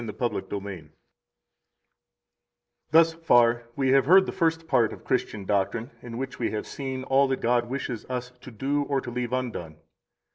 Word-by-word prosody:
The 115 - -6
Apostles' 120 -2 -2
Creed 100 -1 -4
1 90 -7 -8 2.0
Thus 165 +1 +5
far 120 -7 +3
we 135 -1 +1
have 135 -1 +5
heard 190 +3 +7
the - - -3
first 165 -1 0
part 120 -7 +3
of - - -12
Christian 100 -2 -2
doctrine, 105 +6 -1
in 115 -1 -7
which 135 +1 -5
we 120 - 0
have 105 - -4
seen 130 -2 -5
all 135 +1 +3
that 135 0 -1
God 120 0 +1
wishes 130 -3 -4
us 125 -1 -4
to - - -10
do 135 +5 -1
or 140 -1 0
to 125 - -7
leave 125 0 -3
undone. 120 -11 -3
125 Hz, 180 wpm, -26 LUFS, 115-135 Hz, 2.0 s, heard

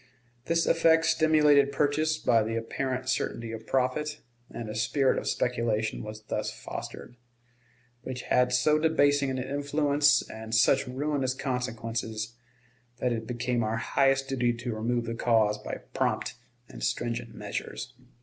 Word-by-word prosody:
This 165 +2 +2
effect 165 0 +4
stimulated 150 -3 +4
purchase 150 +3 +1
by 115 -2 +3
the 110 +1 -2
apparent 130 +3 -3
certainty 115 -3 -2
of 115 0 -8
profit, 145 +4 0 0.3
and 115 - -6
a 105 - -5
spirit 130 +5 +1
of - - -6
speculation 115 -3 0
was 110 0 -8
thus - - -3
fostered, 120 - -8 0.8
which 125 0 -6
had 125 0 +2
so 140 +5 +3
debasing 145 -3 +3
an 130 - -2
influence 145 +2 +2
and 110 0 -5
such 135 +4 +4
ruinous 135 0 -1
consequences 115 -3 -3 0.6
that 125 -1 0
it 110 -1 -4
became 125 0 -1
our 110 0 -1
highest 135 +2 +2
duty 125 -3 +1
to 120 0 -4
remove 115 +2 -1
the 115 - -3
cause 110 -3 +2
by - - -5 0.2
prompt - - 0 0.3
and - - -9
stringent 115 - -2
measures. - - -5
125 Hz, 140 wpm, -28 LUFS, 115-145 Hz, 0.8 s, effect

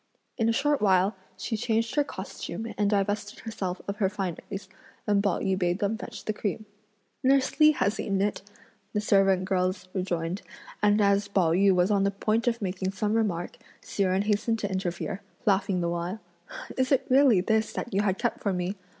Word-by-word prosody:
In 225 -1 +1
a - - +4
short 285 +4 +1
while, 195 0 +3 0.2
she 225 +4 -3
changed 225 +1 0
her 295 - +3
costume 225 -4 -6
and 205 -1 +1
divested 205 0 -1
herself 190 -5 -4
of 200 +1 -3
her 195 -3 +2
fineries, 195 0 -5 0.4
and 205 -2 +3
Pao 200 -4 +1
yü 190 -1 0
bade 175 -1 +1
them 205 +2 0
fetch 230 0 -8
the 215 - -1
cream. 210 +1 -3 0.6
"Nurse 270 +2 +2
Li 305 0 +7
has 205 -6 0
eaten 195 -1 -1
it," 205 +1 0 0.5
the 210 - +1
servant 195 -2 +3
girls 185 0 -1
rejoined, 180 -1 -2 0.4
and 210 0 +4
as 200 0 +3
Pao 190 -5 +2
yü 195 +4 +4
was 180 +2 +3
on 200 -1 +3
the 200 - +3
point 215 +4 0
of 235 -2 0
making 185 0 -2
some 210 +2 -1
remark 200 -6 -1 0.2
Hsi - - -4
Jen 190 0 +2
hastened 215 +2 +1
to 205 -2 -3
interfere, 185 0 -3 0.2
laughing 190 -2 +2
the 170 - 0
while; 175 +4 -3 0.6
"Is 260 +1 +1
it 270 - +3
really 260 -6 +5
this 220 +3 +1
that 240 - -5
you 195 - +3
had 195 -2 +1
kept 240 - -1
for 200 - 0
me? 180 +2 -2
200 Hz, 195 wpm, -27 LUFS, 185-220 Hz, 0.6 s, Li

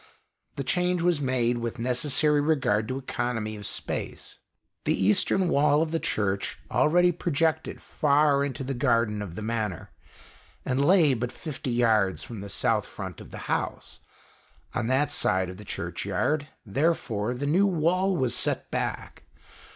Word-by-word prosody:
The 140 - -3
change 180 +3 0
was 175 -4 +2
made 125 -3 +1
with 115 +1 -4
necessary 140 +5 +2
regard 130 -8 +1
to 130 - -3
economy 120 -4 -3
of 105 -1 -7
space. - - -5 0.4
The - - 0
Eastern 105 - +3
wall 150 -1 +3
of 160 - -4
the 165 - 0
Church 100 -7 -1
already 175 +3 +4
projected 160 -1 -1
far 145 -1 +2
into 135 -2 -3
the 135 +1 -3
garden 115 -4 +1
of 90 -5 -6
the 110 - -5
Manor, 110 -5 -3 0.7
and 135 +1 +1
lay 165 -3 +5
but 125 0 -2
fifty 145 -3 -6
yards 110 -5 +2
from 115 -4 -8
the 100 - -7
south - - 0
front - - -8
of - - -12
the - - -8
house. - - -3 0.7
On - - -1
that 135 +4 +1
side 95 0 +1
of 90 - -11
the 105 - -11
Churchyard, 100 - -2 0.2
therefore, 120 -3 0
the 135 +3 -3
new 180 +8 +3
wall 185 +2 +1
was 130 -5 +1
set - - 0
back. - - -4
130 Hz, 155 wpm, -27 LUFS, 110-155 Hz, 0.7 s, lay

